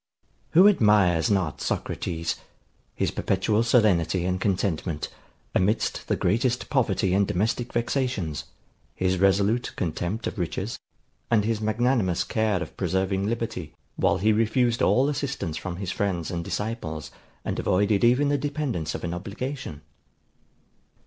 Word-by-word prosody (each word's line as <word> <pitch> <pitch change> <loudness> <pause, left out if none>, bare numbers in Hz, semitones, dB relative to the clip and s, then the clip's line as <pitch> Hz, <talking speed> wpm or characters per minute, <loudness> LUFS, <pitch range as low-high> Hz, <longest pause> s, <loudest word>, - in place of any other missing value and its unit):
Who 185 +5 +8
admires 105 - +4
not 95 -7 0
Socrates; 85 -1 -2 0.6
his - - 0
perpetual 105 +3 +1
serenity 95 -7 +3
and 90 +1 -1
contentment, 90 -5 -1 0.4
amidst 105 +5 0
the - - +1
greatest 120 +6 0
poverty 115 -8 +2
and 100 0 +3
domestic 115 +6 -1
vexations; 120 - -1 0.5
his 95 -1 0
resolute 100 +5 +2
contempt 90 +4 -2
of - - -4
riches, 95 +6 -3 0.5
and 110 -3 +3
his 110 -1 0
magnanimous 110 -4 +1
care 110 -5 0
of 80 - -11
preserving 95 +1 0
liberty, 115 -8 -3 0.2
while - - +2
he 110 +4 +3
refused 115 +2 +2
all 130 +2 +4
assistance 140 - -2
from 90 +2 -4
his 95 0 -4
friends 95 -4 -1
and 85 -1 -3
disciples, 95 -8 -4 0.3
and - - -2
avoided 100 +2 +2
even 125 +5 +4
the 145 0 +1
dependence 135 - -2
of - - -6
an 85 0 -2
obligation? 100 - -5
100 Hz, 130 wpm, -26 LUFS, 90-120 Hz, 0.6 s, Who